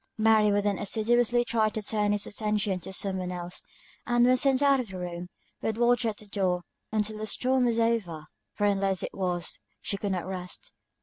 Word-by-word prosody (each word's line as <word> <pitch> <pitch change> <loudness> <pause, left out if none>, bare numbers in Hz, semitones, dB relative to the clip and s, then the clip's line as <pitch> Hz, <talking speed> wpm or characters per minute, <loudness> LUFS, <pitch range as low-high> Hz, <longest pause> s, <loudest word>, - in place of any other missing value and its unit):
Mary 215 -1 +4
would 205 0 +2
then 205 -2 0
assiduously 240 +3 +2
try 220 -2 +2
to 215 - -4
turn 210 0 0
his 205 0 +1
attention 210 -3 -1
to 180 - -8
something 190 -1 0
else; 180 0 -6 0.5
and 240 0 +4
when 255 +1 +5
sent 270 +1 +3
out 275 -1 +5
of 250 - -3
the 190 -2 -8
room, 180 0 -5 0.3
would 220 0 -1
watch 240 0 +3
at 220 -2 -1
the 215 - -9
door, 185 -3 0 0.3
until 215 0 -1
the 215 - -3
storm 255 +3 +1
was 235 -1 +1
over, 215 -9 0 0.3
for 205 - 0
unless 195 -2 +1
it - - -4
was, 180 -2 -2 0.2
she 200 - -3
could 200 -1 -2
not 180 -2 -2
rest. 185 - -6
210 Hz, 200 wpm, -28 LUFS, 190-230 Hz, 0.5 s, when